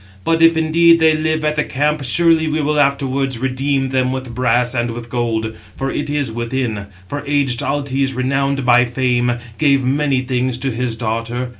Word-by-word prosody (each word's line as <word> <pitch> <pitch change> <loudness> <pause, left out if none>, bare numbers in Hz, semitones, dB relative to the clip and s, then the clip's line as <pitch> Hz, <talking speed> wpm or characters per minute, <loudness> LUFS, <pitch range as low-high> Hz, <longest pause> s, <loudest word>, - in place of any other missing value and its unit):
But 165 +7 +1
if 165 0 +5
indeed 165 +1 +4
they 160 -1 +4
live 155 0 -1
at 150 0 0
the 150 - +2
camp, 150 +1 -1
surely 165 +4 +3
we 155 0 -1
will 150 0 0
afterwards 135 -2 0
redeem 135 +2 -1
them 130 -1 0
with 130 -2 -5
brass 125 0 +1
and 120 -1 -1
with 115 0 -7
gold; 110 -2 -2 0.2
for 135 0 -3
it 145 - -3
is 145 -5 -1
within; 115 -3 -3 0.2
for 145 +5 -5
aged 140 -4 +1
Altes, 135 -2 -1
renowned 135 +1 -1
by 125 0 +5
fame, 120 0 0 0.3
gave 140 -3 +3
many 135 0 +1
things 130 -1 -1
to 135 +1 -2
his 120 0 -2
daughter. 115 +2 -3
130 Hz, 180 wpm, -18 LUFS, 125-145 Hz, 0.3 s, if